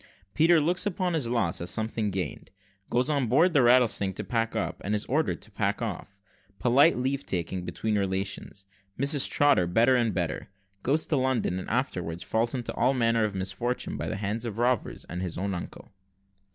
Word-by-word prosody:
PETER 165 +2 +5
LOOKS 175 +6 +1
UPON 185 -2 -1
HIS 145 -8 0
LOSS 115 -10 0
AS 85 - -1
SOMETHING 110 0 0
GAINED 95 -2 -4 0.4
GOES 125 +2 +1
ON 140 -4 +1
BOARD 165 +10 +4
THE 145 - +5
"Rattlesnake" 120 -6 +3
TO - - -4
PACK 115 -1 -1
UP, 110 - -3
AND 105 +2 0
IS 105 - -2
ORDERED 155 +4 -1
TO 110 - -14
PACK 100 0 -1
OFF 95 -2 -6 0.4
POLITE 135 - +4
LEAVE 135 +2 -1
TAKING 90 0 -3
BETWEEN 105 +5 -1
RELATIONS 95 0 -3 0.3
MRS. 140 0 +3
TROTTER 145 -12 +3
BETTER 115 +8 +4
AND 115 -6 +1
BETTER 85 -3 -2 0.3
GOES 150 +8 +1
TO 150 - 0
LONDON, 130 -8 0
AND - - -7
AFTERWARDS 90 -9 -2
FALLS 115 +3 0
INTO 120 -2 -4
ALL 130 +3 +2
MANNER 115 -2 +2
OF 105 -2 -4
MISFORTUNES 100 +6 -3
BY - - -3
THE - - -3
HANDS 105 +4 -3
OF 110 -2 -5
ROBBERS, 120 -2 0
AND 90 - -5
OF - - -2
HIS 90 -3 -4
OWN 100 +2 -2
UNCLE. 85 - -8
115 Hz, 190 wpm, -27 LUFS, 95-130 Hz, 0.4 s, PETER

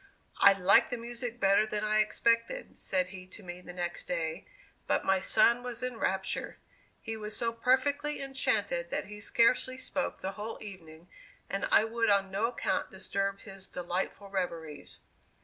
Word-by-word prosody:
"I 200 - +9
liked 195 0 +5
the 245 - -2
music 240 0 -6
better 200 +2 +4
than 210 -1 -2
I 215 0 +2
expected," 230 - +1
said 185 -1 0
he 185 -1 -10
to 200 +3 -12
me 180 0 -8
the 180 - -9
next 175 -1 -4
day, 165 0 -3 0.4
"but - - +1
my 190 0 +4
son 235 +5 +4
was 245 -1 -5
in 250 -2 -2
raptures. 190 0 -1 0.5
He 225 - -4
was 215 -1 -6
so 230 -1 0
perfectly 265 +5 +1
enchanted 215 -10 0
that - - -2
he 210 +1 -9
scarcely 235 +4 +3
spoke 275 +1 -3
the 190 - -2
whole 210 +3 -6
evening 170 -5 -10 0.4
and 195 0 0
I - - +6
would 230 0 0
on 195 -1 +3
no 200 +4 +1
account 240 - -1
disturb 195 +1 -2
his 195 -2 -6
delightful 185 +3 -3
reveries. 165 -5 -3
200 Hz, 165 wpm, -31 LUFS, 185-230 Hz, 0.5 s, I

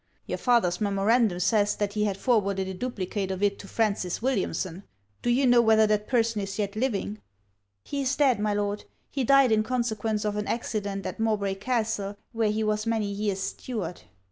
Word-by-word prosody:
Your - - -4
father's 220 -8 +2
memorandum 205 0 +2
says 205 +2 +2
that 205 -1 -2
he 210 0 +1
had 200 -2 -1
forwarded 200 -5 +1
a 190 - -4
duplicate 195 -2 -3
of 190 +1 -3
it 200 -1 +1
to 195 - -10
Francis 200 -6 0
Williamson; 195 -7 -1 0.4
do - - -1
you 255 +3 +3
know 245 -1 +6
whether 220 -1 +5
that 210 0 0
person 230 -4 +1
is 195 0 -5
yet 205 -1 -2
living?' 215 -3 -1 0.6
'He 280 - -3
is 270 +1 0
dead, 265 -6 +3
my 210 0 0
Lord. 205 0 -2 0.3
He 270 - -1
died 275 -1 +5
in 215 -1 +4
consequence 220 -3 -1
of 210 0 -1
an 210 - -2
accident 205 -4 -3
at - - -5
Mowbray 210 -3 +1
Castle, 210 -2 -2
where 225 -2 +1
he 215 +1 0
was 215 +1 0
many 220 -3 0
years 200 -1 -2
steward.' 195 -4 -4
210 Hz, 190 wpm, -27 LUFS, 200-230 Hz, 0.6 s, know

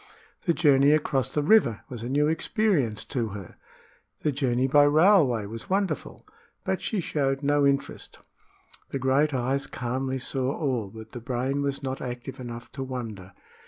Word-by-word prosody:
The 170 - +3
journey 140 -2 +5
across 135 -4 +1
the 150 +2 -1
river 150 - +4
was 120 -3 -7
a 120 - -4
new 145 +2 +2
experience 160 - 0
to 120 -5 -2
her 95 -3 -11 0.7
the 150 - +2
journey 130 -2 +1
by 145 +2 +5
railway 145 - +4
was 115 +2 -8
wonderful; 195 0 -2 0.4
but - - -1
she 215 - -1
showed 140 -4 -1
no 145 0 +3
interest. 140 0 -2 0.7
The - - -2
great 135 +3 +2
eyes 135 +1 -1
calmly 130 +2 -3
saw 130 +1 -2
all, 125 -9 -1
but 110 +2 -11
the 120 - -7
brain 130 +3 -1
was 140 0 -2
not 130 0 -3
active 125 +1 -6
enough 120 -2 -8
to 135 - -5
wonder. 110 -8 -6
135 Hz, 160 wpm, -26 LUFS, 120-145 Hz, 0.7 s, journey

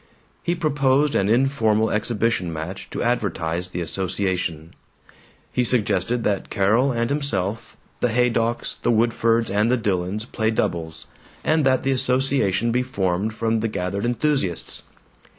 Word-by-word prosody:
He 175 - 0
proposed 145 -3 +2
an 100 - +1
informal 110 -3 +2
exhibition 105 -4 0
match 80 +4 -6
to - - -3
advertise 90 -7 -1
the 90 -1 -5
association; 90 -2 -2 0.8
he 125 - +1
suggested 115 -1 +1
that 100 -2 -1
Carol 115 +8 +2
and 115 +1 -1
himself, 115 -7 -2 0.2
the 125 - +1
Haydocks, 120 0 0
the - - 0
Woodfords, 115 0 +2
and 105 +4 +2
the 125 - +3
Dillons 100 -1 -1
play 110 -2 -1
doubles, 80 -7 -2 0.4
and 155 0 +2
that 130 -1 +2
the 135 - +1
association 125 -4 +2
be 125 +2 +2
formed 105 -4 -1
from 115 0 0
the 115 - 0
gathered 100 -1 -3
enthusiasts. 120 - 0
110 Hz, 135 wpm, -23 LUFS, 95-125 Hz, 0.8 s, the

